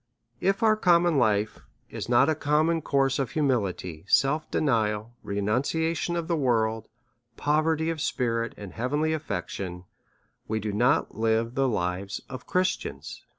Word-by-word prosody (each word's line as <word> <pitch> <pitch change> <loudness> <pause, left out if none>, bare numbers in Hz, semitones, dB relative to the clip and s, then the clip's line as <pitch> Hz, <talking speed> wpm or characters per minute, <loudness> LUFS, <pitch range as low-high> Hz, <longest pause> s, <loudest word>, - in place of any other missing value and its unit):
If 195 +4 +1
our 215 -1 +5
common 175 -6 +3
life 110 -3 +1 0.3
is - - -6
not 125 +3 +5
a 160 - +3
common 155 +2 +1
course 135 -2 +1
of 135 - -1
humility, 100 - -1
self 150 +7 +2
denial, 110 -5 0
renunciation 140 - -1
of 170 -1 -2
the 170 - +1
world, 115 -6 +1 0.5
poverty 155 +2 +1
of 160 -2 -5
spirit, 115 -4 -1
and 100 -3 -9
hea 110 - -8
venly 155 +3 0
affection, 90 - -4 0.6
we 110 0 -1
do 105 -1 -3
not 120 +5 +2
live 115 +1 +1
the 135 0 +1
lives 95 -1 -2
of 130 -1 -8
Christians. 185 +1 -2
130 Hz, 145 wpm, -27 LUFS, 110-155 Hz, 0.6 s, our